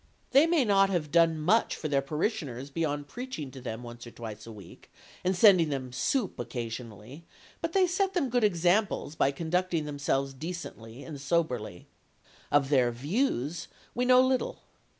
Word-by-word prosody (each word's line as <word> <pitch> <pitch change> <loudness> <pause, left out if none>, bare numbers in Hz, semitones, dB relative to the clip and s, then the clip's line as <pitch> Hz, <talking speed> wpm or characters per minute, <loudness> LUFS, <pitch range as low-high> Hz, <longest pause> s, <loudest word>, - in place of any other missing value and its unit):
They 285 +4 +6
may 330 -6 +3
not 195 -2 +4
have 165 -6 -1
done 165 0 +4
much 185 +9 +2
for 155 - -4
their 140 -2 +2
parishioners 140 - -3
beyond 145 -2 -2
preaching 240 - -6
to 130 0 -10
them 120 -1 -6
once 120 0 -9
or - - -7
twice 115 -2 -9
a - - -8
week, 100 -5 -14 0.3
and 185 +1 +1
sending 180 -6 +6
them 130 -3 -4
soup 200 - -1
occasionally, 120 +2 -6 0.4
but 330 0 -3
they 385 -1 +5
set 375 +2 0
them 280 -9 0
good 245 -1 +2
examples 180 -2 +2
by 145 - +2
conducting 165 +2 -1
themselves 140 -2 -1
decently 135 -6 -7
and 145 -4 -8
soberly. 130 - -1 0.7
Of 140 -2 +3
their 130 -4 +3
"views" 150 - -1 0.3
we 245 - 0
know 255 0 +7
little. 260 -1 -1
155 Hz, 165 wpm, -29 LUFS, 130-195 Hz, 0.7 s, know